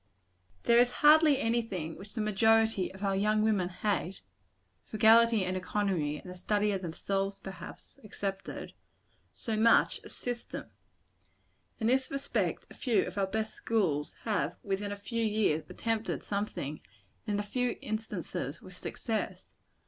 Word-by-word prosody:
There 235 0 +5
is 245 0 +5 0.2
hardly 305 -1 +7
any 235 +1 +2
thing 170 -8 -5
which 200 +3 -12
the 220 - -1
majority 220 -1 +3
of 190 +1 -10
our 195 -1 +1
young 215 +2 +2
women 205 -5 +2
hate 195 -1 -2 0.6
frugality 225 -1 +5
and 185 +1 -2
economy, 185 -6 -1
and - - -13
the 180 - -6
study 210 +3 +1
of 195 -2 -2
themselves, 195 +3 -2
perhaps, 195 -1 -10
excepted 195 -2 -5 0.6
so 225 - -4
much 225 +2 +4
as - - -6
system. 245 -1 -5 1.1
In 220 - -2
this 260 +3 +2
respect 275 0 -1
a - - -9
few 240 -5 +1
of - - -7
our 195 - +2
best 220 +2 -2
schools 175 -10 0
have, 185 -8 -1
within 200 +1 -2
a - - -2
few 225 +3 -3
years, 210 -8 +1
attempted 225 -1 -2
something; 200 -8 -3 0.5
and, 205 - 0
in - - 0
a - - -1
few 245 +4 -1
instances, 200 - -4
with 185 -1 -13
success. 220 +4 -3
210 Hz, 150 wpm, -31 LUFS, 190-225 Hz, 1.1 s, hardly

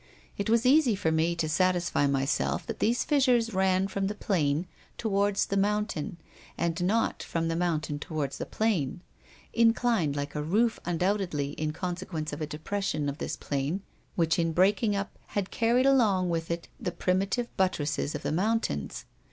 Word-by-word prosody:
It 200 - -2
was 230 +2 +3
easy 260 -4 +5
for 165 -5 0
me 160 +2 +2
to 165 -2 -1
satisfy 175 -2 +2
myself 135 +1 0
that - - -5
these 235 +2 +2
fissures 250 -6 +3
ran 190 0 +2
from 195 0 -2
the 210 - -3
plain 160 -6 0 0.3
toward 205 -2 +1
the 200 0 0
mountain 205 -3 0 0.4
and 170 +1 -1
not 220 +5 +1
from 165 -1 -2
the 165 - 0
mountain 155 -4 -1
toward 150 -4 -3
the - - -5
plain, 185 -8 0 0.5
inclined 230 -9 +3
like 145 0 -3
a 150 - -2
roof 215 +9 +1
undoubtedly, 175 -4 0
in 155 +1 -2
consequence 175 -2 -4
of - - -5
a 155 - -2
depression 155 -1 -2
of 140 - -6
this - - -3
plain 145 +7 -2 0.3
which 165 -1 +2
in 165 -1 +1
breaking 205 +4 +3
up 200 0 -4 0.2
had 195 -2 -1
carried 240 +3 +2
along 210 -10 +3
with 165 -1 -2
it 170 0 -3
the 180 - -2
primitive 190 +7 -1
buttresses 155 -6 0
of - - -5
the - - -1
mountains. 220 +8 -1
185 Hz, 170 wpm, -28 LUFS, 160-210 Hz, 0.5 s, easy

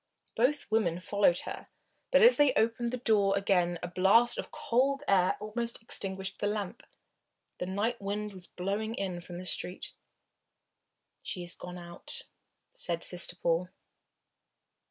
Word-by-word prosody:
Both 275 +5 +2
women 180 -6 +2
followed 190 -1 +2
her, - - -7 0.4
but - - +5
as 480 +2 +9
they 290 -3 +5
opened 230 +1 +1
the 250 - -2
door 210 -5 +3
again 180 -3 +2
a - - -1
blast 195 +7 +4
of - - -5
cold 275 +4 +1
air 185 -2 +3
almost 230 +3 -3
extinguished 195 -3 -4
the 205 - 0
lamp. 205 +1 -3 0.8
The 180 - -3
night 210 +5 -1
wind 205 +1 -3
was 185 -2 -7
blowing 205 +5 -3
in 185 -4 -3
from 175 0 -9
the 185 - -7
street. 180 0 -1 1.3
"She 180 - -5
is 175 0 -3
gone 180 0 -8
out," 170 -1 -6 0.5
said 170 -1 +1
Sister 175 0 0
Paul. 175 0 0
200 Hz, 145 wpm, -30 LUFS, 180-230 Hz, 1.3 s, as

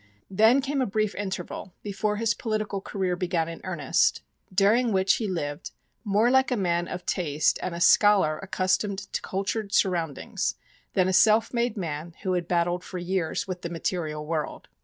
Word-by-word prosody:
Then 220 +7 +5
came 275 0 -1
a 255 - +1
brief 215 0 0
interval, 190 -2 -5
before 210 +1 -1
his 225 +1 +1
political 215 -3 -3
career 190 -2 -2
began 175 -2 -1
in 165 0 -8
earnest, 170 -7 +1 0.3
during 215 +6 +3
which 190 -1 +3
he 220 - -2
lived 145 -6 -4 0.3
"more 215 +3 +3
like 265 0 +4
a 250 - 0
man 175 -3 0
of 180 -1 -6
taste 155 -4 +1
and 180 -2 -3
a - - -5
scholar 175 -3 +5
accustomed 195 +1 0
to 190 - -5
cultured 200 +2 -3
surroundings 170 -9 0 0.4
than 185 -1 +3
a 190 - 0
self 220 +4 +4
made 235 -2 0
man 165 -2 -5
who 185 - 0
had 175 -2 -1
battled 175 0 0
for 185 - -7
years 175 -1 -2
with 180 -1 -5
the 170 - -4
material 160 -3 -3
world." 155 -1 -4
190 Hz, 175 wpm, -26 LUFS, 170-210 Hz, 0.4 s, Then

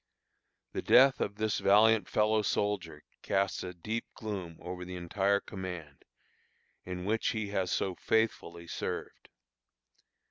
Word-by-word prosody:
The - - -3
death 135 +1 +6
of 100 - -1
this 110 0 0
valiant 110 +2 +5
fellow 110 0 +3
soldier 95 -7 -1 0.2
casts 95 -1 0
a 90 - -5
deep 110 +6 -4
gloom 95 -7 -5
over 90 0 -6
the 90 0 -7
entire 95 +3 +1
command, 90 -8 -8 0.8
in 90 0 -5
which 110 +2 0
he 110 -2 -1
has 95 -3 -1
so 95 - 0
faithfully 90 -5 -1
served. - - -5
100 Hz, 130 wpm, -31 LUFS, 90-110 Hz, 0.8 s, death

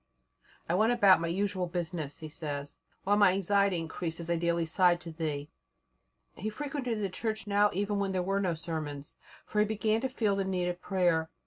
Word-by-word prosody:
"I 165 - 0
went 215 +6 +3
about 200 -8 +6
my 165 - -1
usual 190 +1 -1
business," 170 -4 -3
he 155 - -5
says, 145 -2 -5 0.2
"while 205 +1 +3
my 205 -3 +6
anxiety 200 0 +2
increased 165 0 -4
as 170 0 -3
I - - +3
daily 170 0 +1
sighed 175 +1 +3
to 170 - -8
Thee." 155 -3 -3 0.9
He 215 - -4
frequented 260 -2 -3
the 200 - 0
Church 220 +3 -3
now 205 0 +3
even 200 +2 -1
when 195 -1 0
there 185 -1 0
were 195 +2 0
no 180 -4 0
sermons, 155 -3 -5 0.3
for 210 - -2
he 210 - +5
began 220 +1 0
to 265 - -1
feel 220 -6 0
the 195 - 0
need 185 -2 -1
of 175 0 -5
prayer. 175 -4 +1
185 Hz, 200 wpm, -30 LUFS, 165-205 Hz, 0.9 s, about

